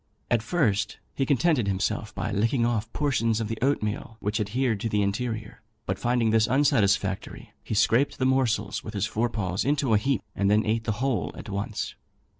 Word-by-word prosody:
At 120 -2 +3
first, 115 - 0 0.2
he 135 - -1
contented 140 -4 +2
himself 105 +3 -1
by 105 - -2
licking 115 +4 +1
off 115 -2 -1
portions 115 -6 +1
of 110 -2 -3
the 115 - -4
oatmeal 115 -4 -1
which 105 +2 -1
adhered 110 +2 0
to 115 - -2
the 105 -1 +1
interior, 110 +1 -3 0.2
but - - -2
finding 120 -2 +2
this 110 0 +4
unsatisfactory, 105 -7 +1
he - - -3
scraped 115 +6 +3
the 130 - 0
morsels 120 -6 +1
with 110 - -7
his 100 0 +1
fore 115 +2 0
paws 95 -4 -2
into 140 -4 +1
a 105 - +5
heap, 135 +4 0
and 100 0 +1
then 105 +1 +3
ate 110 +1 0
the 110 - 0
whole 120 -10 0
at - - -9
once. 100 +2 -3
110 Hz, 190 wpm, -26 LUFS, 105-125 Hz, 0.2 s, a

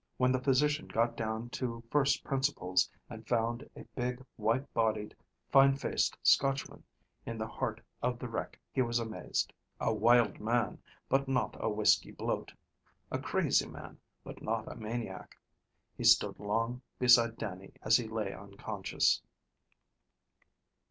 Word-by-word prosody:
When 125 0 +3
the 130 0 +1
physician 150 +3 +2
got 115 +1 +1
down 110 +1 -3
to 115 -3 -4
first 145 -1 +3
principles, 135 -9 +1 0.2
and 110 0 -10
found 120 +1 0
a - - -9
big, 125 +1 -3
white 115 +5 0
bodied, 110 -2 0 0.4
fine 135 0 +7
faced 140 - 0
Scotchman 135 0 +2 0.4
in 115 - -5
the 110 - -2
heart - - -3 0.2
of 125 0 0
the 125 - -5
wreck, 115 - -5
he 130 - +1
was 120 -1 +1
amazed. 115 -2 -2 0.3
A 110 - +1
wild 115 -1 +4
man, 115 +1 0 0.3
but 135 +1 +2
not 135 -1 0
a - - 0
whiskey 105 0 +3
bloat. - - -3 0.6
A - - -1
crazy - - +1
man, - - -10 0.2
but - - -10
not - - -2
a - - -6
maniac. 110 -3 -6 0.6
He - - -6
stood - - +5
long 115 +4 -1 0.2
beside 120 -2 +5
Dannie 95 -1 -6
as 110 +1 +6
he 120 - -3
lay 110 -3 -3
unconscious. 100 0 -1
115 Hz, 145 wpm, -32 LUFS, 110-125 Hz, 0.6 s, fine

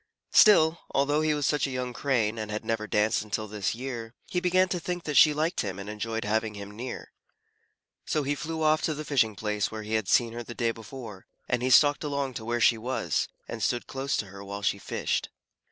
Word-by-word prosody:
Still, 165 -6 +6 0.2
although 145 +2 +2
he 155 -1 +2
was 145 -1 -1
such 145 -2 +1
a - - -5
young 125 -1 -3
Crane 115 -5 0
and 110 -1 -4
had 105 0 -4
never 115 -1 -1
danced 105 0 +2
until 110 0 -3
this 105 0 -2
year, 120 -2 -6
he 180 - -1
began 185 +1 +3
to 180 - -1
think 175 +1 -4
that 150 - -3
she 150 - +8
liked 155 +4 0
him 95 -3 -4
and 100 0 -7
enjoyed 110 +1 -3
having 110 0 0
him 100 0 -8
near. 125 +3 -6 1.0
So 150 - 0
he 140 +1 0
flew 160 +2 -4
off 155 0 +3
to 155 - -1
the 155 +1 -6
fishing 115 -8 +2
place 105 -1 -1
where 110 -1 -6
he 110 +1 -5
had 110 -3 0
seen 115 -2 +3
her 120 - -5
the 120 0 -8
day 115 -2 +1
before, 115 -3 -10 0.2
and 125 -1 0
he 130 - +1
stalked 145 +4 +5
along 140 -2 -2
to 110 -2 -6
where 120 +1 -1
she 115 0 +4
was, 125 +4 -1 0.2
and - - -6
stood 120 -1 0
close 135 +1 -2
to - - -2
her 100 0 -10
while 100 +1 -6
she 100 - +1
fished. - - -2
120 Hz, 230 wpm, -28 LUFS, 110-145 Hz, 1.0 s, she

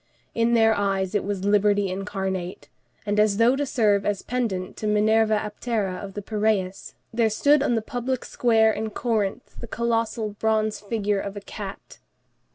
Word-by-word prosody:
In 230 +1 +2
their 225 -1 +5
eyes 195 -2 -1
it 205 - +1
was 200 -1 -3
liberty 205 0 +3
incarnate; 190 -2 -4 0.4
and 205 0 0
as 210 -1 +3
though 235 +3 +4
to 285 +1 -2
serve 210 -6 +2
as 205 -1 -1
pendant 220 -7 -2
to 215 - -3
the - - +2
Minerva 215 +1 +3
Aptera 210 -3 -2
of 195 -1 -8
the 205 - -5
Piræus, 205 -3 -1 0.2
there 225 -1 +2
stood 285 +7 +3
on 245 -4 +1
the 225 - -1
public 245 +2 -3
square 225 -2 +3
in 220 +1 -3
Corinth 215 -3 -2
the 235 - -7
colossal 230 -1 -1
bronze 215 -1 +1
figure 205 -1 -1
of 200 +1 -5
a - - -6
cat. 200 -1 -9
215 Hz, 170 wpm, -24 LUFS, 200-225 Hz, 0.4 s, their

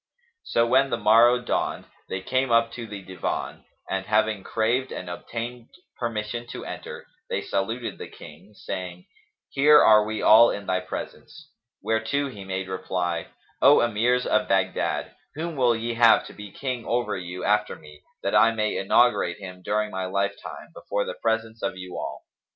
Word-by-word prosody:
So 115 - +1
when 130 +3 +3
the 120 - -1
morrow 115 +3 +5
dawned, 120 - -2 0.2
they 95 - -3
came 130 +6 0
up 115 0 +3
to 115 -2 -7
the 100 -2 -8
Divan 90 -2 -4 0.2
and, 95 0 -3
having 110 -1 +1
craved 120 +4 0
and 90 - -6
obtained 115 +6 -6 0.3
permission 120 0 -4
to - - -7
enter, - - -8 0.2
they - - -2
saluted 115 +5 -3
the - - -6
King, 90 +8 -14
saying, 90 -2 -6 0.4
"Here 150 +2 +6
are 105 -1 +6
we 110 0 -4
all 115 +2 +7
in 100 - -4
thy 95 0 0
presence." 145 +10 -8 0.3
Whereto 110 +6 0
he 105 -6 -9
made 95 0 -4
reply, 90 -2 -2 0.3
"O - - +7
Emirs 120 +2 +1
of - - +1
Baghdad, - - 0 0.2
whom 165 +1 -4
will 125 -3 +3
ye 115 +1 -3
have 115 -1 +5
to - - -11
be 105 -1 -10
King 130 -2 -4
over 120 +1 -1
you 90 0 -6
after 105 0 +1
me, 75 -1 -15 0.2
that - - -1
I 115 - +6
may 105 -1 -1
inaugurate 95 -3 +3
him 90 -2 -10
during 105 +2 -1
my 95 0 -3
lifetime, 100 +2 -3
before 100 0 -3
the - - -4
presence 115 0 -1
of 95 -1 -2
you 90 -1 -8
all?" 70 - -6
110 Hz, 170 wpm, -25 LUFS, 95-120 Hz, 0.4 s, all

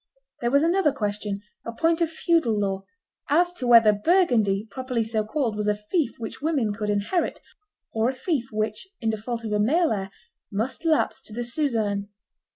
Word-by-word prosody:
There 240 - +1
was 280 +4 +4
another 340 -2 +3
question, 205 -4 -3 0.2
a 230 - -5
point 325 +8 +1
of 335 - +2
feudal 320 - +1
law, 195 -1 -2 0.4
as 350 +4 +3
to 260 -8 -4
whether 230 -3 +7
Burgundy, 220 - +2
properly 255 0 -2
so 220 -1 -1
called, 225 0 -1
was 210 0 -2
a 210 - +3
fief 240 - -1
which 225 +1 -7
women 280 -9 +1
could 210 0 -3
inherit, 205 - 0 0.5
or 225 +2 +2
a 265 - -3
fief 265 -3 -1
which, 215 - -2
in 225 -2 0
default 230 +2 -4
of 220 - -4
a 210 - +1
male 315 +11 +3
heir, 195 -3 -2 0.4
must 230 - -3
lapse 310 -4 +2
to 220 - -11
the 240 +2 -3
suzerain. 225 -7 -1
230 Hz, 180 wpm, -25 LUFS, 210-295 Hz, 0.5 s, whether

